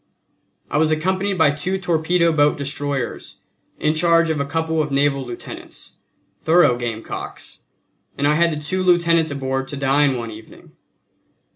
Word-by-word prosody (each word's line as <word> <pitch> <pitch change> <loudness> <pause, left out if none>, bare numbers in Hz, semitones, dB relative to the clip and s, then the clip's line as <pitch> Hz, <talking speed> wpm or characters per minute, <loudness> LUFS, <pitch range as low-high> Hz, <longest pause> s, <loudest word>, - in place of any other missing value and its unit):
I 150 - +1
was 155 0 +3
accompanied 190 +5 0
by 160 -4 +4
two 165 +7 -2
torpedo 170 -1 +1
boat 145 -1 +2
destroyers, 140 -2 -4 0.4
in 155 - +1
charge 165 0 +3
of 155 - -2
a 140 - -1
couple 160 +1 -1
of 150 - -2
naval 140 0 +1
lieutenants, 120 -2 -9 0.4
thorough 160 -6 +4
gamecocks; 115 -2 -6 0.6
and 145 - +1
I 150 - +3
had 170 +2 +3
the - - -2
two 150 +6 -2
lieutenants 170 -3 +3
aboard 135 -1 -3
to 145 - -6
dine 135 0 +2
one 115 -1 -5
evening. 110 +1 -14
150 Hz, 150 wpm, -20 LUFS, 140-170 Hz, 0.6 s, by